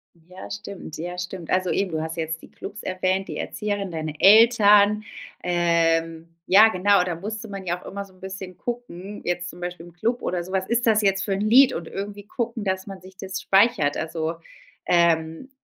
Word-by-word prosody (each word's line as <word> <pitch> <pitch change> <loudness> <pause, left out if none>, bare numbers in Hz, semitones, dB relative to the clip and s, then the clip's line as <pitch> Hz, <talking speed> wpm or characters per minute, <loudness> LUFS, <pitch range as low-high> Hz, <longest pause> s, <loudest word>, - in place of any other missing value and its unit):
Ja, 180 +3 -12
stimmt. 200 -6 -8
Ja, 175 +2 -5
stimmt. 180 -1 -6
Also 185 0 +1
eben, 195 -2 0
du 160 -1 -2
hast 160 +1 -5
jetzt 160 0 -3
die - - -14
Clubs 210 +2 -9
erwähnt, 185 +1 -1
die - - -6
Erzieherin, 205 -3 -3
deine 155 -2 -5
Eltern. 210 -1 +6 0.4
Ähm, 165 -1 +1
ja, 210 +4 +7
genau, 200 -1 +3
da 180 -1 -2
musste 215 +5 -6
man 195 -2 -7
ja 175 0 -2
auch - - -17
immer 200 0 -5
so 195 - -20
'n - - -23
bisschen 190 -1 -8
gucken, 210 -5 -6
jetzt 175 0 -2
zum 175 - -12
Beispiel 175 -1 -6
im 175 - -15
Club 230 +8 -1
oder 180 -1 -2
so: 185 - -10
Was 190 0 -1
ist 235 0 0
das 215 -1 +4
jetzt 195 -1 +2
fürn 195 -1 -1
Lied? 245 +6 +6
Und 165 -1 -5
irgendwie 205 +1 -6
gucken, 230 0 -4
dass 190 0 -2
man 195 -2 -9
sich 185 0 -15
das 190 +1 -5
speichert. 195 -8 +3
Also, 160 0 -3 0.5
ähm, 165 +4 +2
190 Hz, 200 wpm, -24 LUFS, 170-205 Hz, 0.5 s, ja